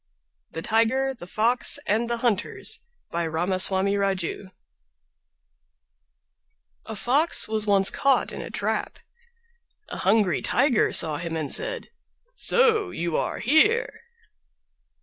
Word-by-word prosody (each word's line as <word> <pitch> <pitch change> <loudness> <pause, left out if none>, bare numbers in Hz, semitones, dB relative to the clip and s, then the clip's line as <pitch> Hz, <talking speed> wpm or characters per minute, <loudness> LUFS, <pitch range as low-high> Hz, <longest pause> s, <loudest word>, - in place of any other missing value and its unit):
THE 165 - -8
TIGER, 235 +4 0
THE 205 -9 -12
FOX, 230 +8 +2
AND 230 +3 -1
THE 235 - -2
HUNTERS 225 -2 -1 0.3
By 170 0 -2
Ramaswami 185 +4 +1
Raju 195 -1 -3 2.4
A 220 - -6
fox 275 +10 +2
was 215 -1 -2
once 195 -1 +3
caught 275 -1 0
in - - -7
a - - -8
trap. - - -3 0.9
A - - -7
hungry 195 -4 +1
Tiger 250 -2 +1
saw 155 -2 +5
him 170 0 -5
and 155 -3 -1
said, - - +1 0.4
"So 455 -5 +3
you 170 - -4
are - - -2
here!" 425 - +1
220 Hz, 115 wpm, -24 LUFS, 185-270 Hz, 2.4 s, saw